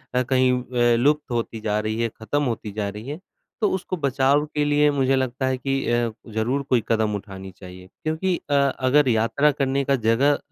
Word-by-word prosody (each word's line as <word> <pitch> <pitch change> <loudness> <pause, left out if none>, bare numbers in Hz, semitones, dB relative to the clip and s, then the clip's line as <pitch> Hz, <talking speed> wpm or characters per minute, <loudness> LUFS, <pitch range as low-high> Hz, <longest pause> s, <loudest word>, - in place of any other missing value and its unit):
अ, 125 - +3
कहीं 130 0 +2 0.2
व 120 -1 +3
लुप्त 145 0 +1
होती 115 -1 -2
जा 105 -1 0
रही 110 +1 -2
है 115 - 0
खत्म 145 +6 -1
होती 115 -4 -3
जा 105 -1 -3
रही 105 +5 -9
है 150 +4 -5 0.4
तो 210 - +3
उसको 185 -1 -3
बचाव 140 +1 +2
के 150 0 +1
लिए 145 0 +3
मुझे 135 -1 +2
लगता 130 0 -1
है 130 0 0
कि 135 +1 -2
अ, 120 -1 +1 0.2
ज़रूर 125 +6 0
कोई 120 -3 +2
कदम 110 -2 +1
उठानी 95 -1 -8
चाहिए 90 0 -12 0.2
क्योंकि 160 +4 0
अ, - - 0 0.3
अगर 135 +2 +3
यात्रा 115 +6 +2
करने 140 -1 0
का 140 - +2
जगह 125 +5 +2
130 Hz, 200 wpm, -23 LUFS, 110-140 Hz, 0.4 s, अ